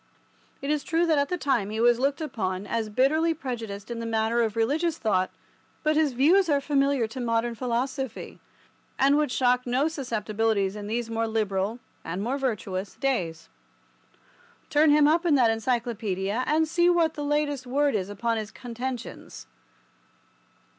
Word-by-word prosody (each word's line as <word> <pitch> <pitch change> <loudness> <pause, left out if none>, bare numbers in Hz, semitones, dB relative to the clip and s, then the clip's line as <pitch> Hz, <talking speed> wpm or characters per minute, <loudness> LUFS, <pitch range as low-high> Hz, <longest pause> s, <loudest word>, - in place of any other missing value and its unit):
It 280 - -1
is 300 -2 0
true 330 +2 +1
that 315 -3 +3
at 280 - 0
the 360 - -1
time 260 - 0
he 215 +1 -4
was 240 0 +4
looked 280 +4 0
upon 205 -10 -3
as 225 0 -2
bitterly 310 +8 +2
prejudiced 230 -7 -6
in 235 - -4
the 230 - -4
matter 225 +1 +1
of 220 -2 0
religious 300 +9 +1
thought, 185 -4 +1 0.5
but 305 0 +2
his 305 -3 +2
views 335 +9 +4
are 285 -2 +3
familiar 275 -3 +1
to 225 +4 -7
modern 230 0 0
philosophy, 250 +1 -3 0.6
and 275 +2 +4
would 300 -3 +1
shock 250 -1 +2
no 260 +5 +2
susceptibilities 220 -8 -1
in 205 -1 -6
these 230 +1 -2
more 225 0 0
liberal 210 -1 -1 0.3
(and 180 +4 -4
more 260 +5 -1
virtuous) 200 -7 -3
days. 180 - -2 1.2
Turn 305 +1 +5
him 295 0 +6
up 325 +3 +3
in 335 -4 +3
that 240 -4 +4
Encyclopedia, 225 -2 -1
and 315 +1 +2
see 345 +2 +3
what 335 -2 +3
the 295 - -5
latest 290 -3 -1
word 285 +3 +1
is 195 -2 -1
upon 230 +3 -1
his 215 -2 -4
contentions. 245 +1 -7
245 Hz, 165 wpm, -26 LUFS, 220-290 Hz, 1.2 s, him